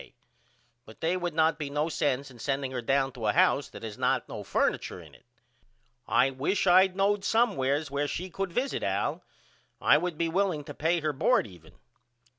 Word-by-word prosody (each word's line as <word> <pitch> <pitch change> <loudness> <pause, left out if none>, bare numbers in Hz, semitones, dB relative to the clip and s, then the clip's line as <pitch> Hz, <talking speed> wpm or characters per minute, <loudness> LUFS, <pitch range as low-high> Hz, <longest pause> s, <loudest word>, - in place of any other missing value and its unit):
K. - - -17 0.7
But 110 - -15
they 165 +3 0
would 175 -3 -3
not 160 0 +2
be 145 -2 -3
no 150 +2 -1
sense 140 -3 -1
in 120 - -15
sending 135 +1 -2
her 125 -2 -3
down 135 +2 +1
to 120 -4 -4
a 105 - +2
house 140 - +3
that - - -11
has 110 -2 -7
not - - +1
no - - -7
furniture - - -1
in - - -14
it. - - -21 0.8
I 135 - +3
wish 140 +9 -1
I 185 +2 +6
knowed 195 +2 0
somewheres 155 - +1
where 145 +1 -1
she 185 +5 -5
could 195 +1 -3
visit 260 +9 -1
Al. - - -1 0.6
I 150 - +5
would 175 -1 -3
be 170 - 0
willing 175 -3 0
to - - -9
pay 165 +2 0
her 155 -1 -1
bord 160 - +2
even. 85 -6 -15
150 Hz, 200 wpm, -28 LUFS, 135-180 Hz, 0.8 s, I